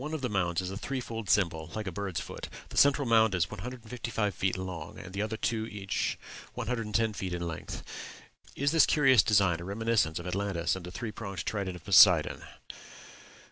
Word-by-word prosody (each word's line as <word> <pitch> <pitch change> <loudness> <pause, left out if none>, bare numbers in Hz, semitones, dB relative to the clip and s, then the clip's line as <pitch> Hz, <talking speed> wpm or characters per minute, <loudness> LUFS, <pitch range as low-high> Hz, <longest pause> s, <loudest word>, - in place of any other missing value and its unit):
One 150 +3 -4
of 155 - -5
the 125 - -1
mounds 90 -3 0
is 90 0 -4
a 95 - -5
threefold 115 -4 -5
symbol, 85 -6 +1
like 110 -1 -3
a 95 - -3
bird's 95 -2 -3
foot; - - -7 0.2
the - - -10
central 140 -1 +5
mound 110 -3 +4
is 85 -2 0
155 115 -4 -4
feet 95 +1 -1
long, 90 -4 -6
and 95 -1 -10
the 100 - -2
other 110 +1 -2
two 110 -1 -1
each 100 -3 -2 0.4
110 115 -2 -1
feet 95 -3 -4
it 85 - -5
length. 85 -2 -6 0.7
Is 140 +1 +1
this 165 -2 +5
curious 135 -5 +5
design 100 -6 +3
a - - -7
reminiscence 100 -4 0
of 85 - -6
Atlantis 90 -2 -1
and 95 - -7
the - - -7
three 105 +5 -5
pronged 100 -5 -6
trident 100 -4 -2
of 85 - -12
Poseidon? 90 -5 +6
100 Hz, 190 wpm, -30 LUFS, 90-115 Hz, 0.7 s, Poseidon